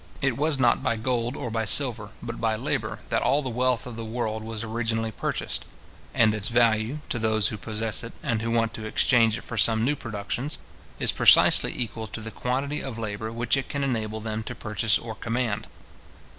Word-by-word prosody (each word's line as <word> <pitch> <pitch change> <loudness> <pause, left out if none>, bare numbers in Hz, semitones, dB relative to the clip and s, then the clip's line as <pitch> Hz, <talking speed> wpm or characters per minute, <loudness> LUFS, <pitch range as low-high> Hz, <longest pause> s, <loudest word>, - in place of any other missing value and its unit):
It 135 -4 +1
was 150 +2 +1
not 125 -2 +3
by 130 -3 +1
gold 120 +2 -1
or 120 - -4
by 115 0 0
silver, 110 -1 +3
but 115 0 -6
by 110 -1 +1
labour, - - -3
that - - +1
all 140 +4 +2
the 130 - -3
wealth 125 -2 +1
of 120 -2 -8
the 115 - -5
world 110 -1 -3
was 110 0 -4
originally 115 0 -2
purchased; - - -3 0.5
and 110 -2 +4
its 110 -1 +1
value, 115 +3 +2
to 120 - -1
those 110 -1 +2
who - - -5
possess 110 0 -1
it, 115 - -7
and 115 -2 0
who 115 - -2
want 115 0 +1
to 110 - -6
exchange 115 0 +3
it - - -9
for 115 - -6
some 110 +1 +4
new 145 +3 +1
productions, 115 +4 -4 0.4
is - - +2
precisely - - +6
equal 115 -2 -3
to 105 - -5
the 110 0 -7
quantity 135 +6 -2
of 130 -4 -6
labour 110 0 -4
which 120 +2 +1
it 135 - -3
can 140 -1 -2
enable 110 -5 -2
them 110 0 -3
to 110 - -6
purchase 110 -1 +1
or 115 -1 -7
command. 115 -1 -2
115 Hz, 205 wpm, -26 LUFS, 110-125 Hz, 0.5 s, precisely